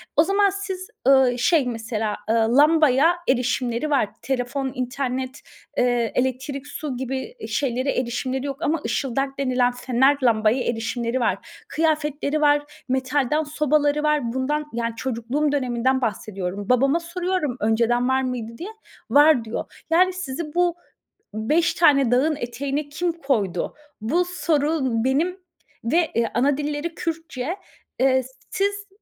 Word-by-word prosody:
O 310 - +6
zaman 400 +3 +3
siz, 380 -1 -5 0.2
ııı, 265 -2 +5
şey, 285 +3 +3
mesela, 225 -2 -2
ııı, 225 +2 +3
lambaya 305 +1 +5
erişimleri 250 +1 0
var. 275 -8 +2
Telefon, 265 +1 -2
internet, 255 +1 -3 0.4
eee, 245 -2 +2 0.2
elektrik, 265 +2 -6
su 290 -3 -5
gibi 265 - -5
şeylere 260 0 0
erişimleri 255 +2 -2
yok 275 -1 -4
ama 330 -1 +1
ışıldak 270 +3 -1
denilen 250 -2 +2
fener 255 +3 +2
lambaya 225 +1 +3
erişimleri 235 +1 -2
var. 240 - -3
Kıyafetleri 305 -4 0
var, 290 0 +1
metalden 265 +3 +1
sobaları 300 0 +1
var. 295 -6 +1
Bundan, 295 +4 -1
yani, 230 0 -2
çocukluğum 255 +5 -1
döneminden 260 -1 +1
bahsediyorum. 200 -3 -3
Babama 275 +6 +3
soruyorum 340 -5 -2
önceden 235 +3 +2
var 260 0 +2
mıydı 240 -3 -4
diye, 360 +5 -6 0.4
var 290 -3 +6
diyor. 225 +1 -7
Yani, 365 +3 +4
sizi 305 -3 -5
bu 350 -1 +2 0.6
5 305 +11 +1
tane 275 -7 +4
dağın 285 +6 +3
eteğine 280 +3 -3
kim 340 +4 -1
koydu? 240 - -1 0.3
Bu 320 +12 +1
soru 320 -3 0 0.2
benim 310 +8 +1 0.5
ve, 320 +8 +1
eee, 235 0 +2
anadilleri 290 +5 0
Kürtçe, 325 -2 -4 0.4
eee, 260 0 +3 0.3
siz 405 -1 -1
270 Hz, 130 wpm, -23 LUFS, 245-305 Hz, 0.6 s, O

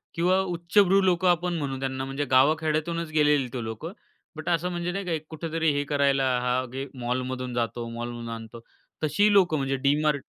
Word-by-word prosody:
किंवा 180 +3 +3
उच्चभ्रू 190 +2 +3
लोकं 185 -1 +2
आपण 175 0 +1
म्हणू 135 -3 -3
त्यांना 130 0 -3
म्हणजे 135 +2 -3
गाव 135 +4 +5
खेड्यातूनच 160 +1 -1
गेलेली 150 -3 +3
ते 125 -3 -3
लोक. 110 +5 -6 0.5
बट 155 +1 -5
असं 175 +1 +1
म्हणजे 175 0 -2
नाही 195 +1 -4
का 175 - -3
एक 155 -1 -2
कुठेतरी 160 0 -1
हे 145 0 0
करायला, 140 -1 +2 0.2
हां, 125 +1 0
घे 135 +3 -5
मॉलमधून 125 +1 -3
जातो, 120 0 -2
मॉलमधून 120 0 -6
आणतो. 115 +1 -10 0.4
तशी 205 +8 +3
लोकं 180 -5 +4
म्हणजे 135 -1 -1
DMart 150 0 +2
150 Hz, 180 wpm, -26 LUFS, 130-170 Hz, 0.5 s, गाव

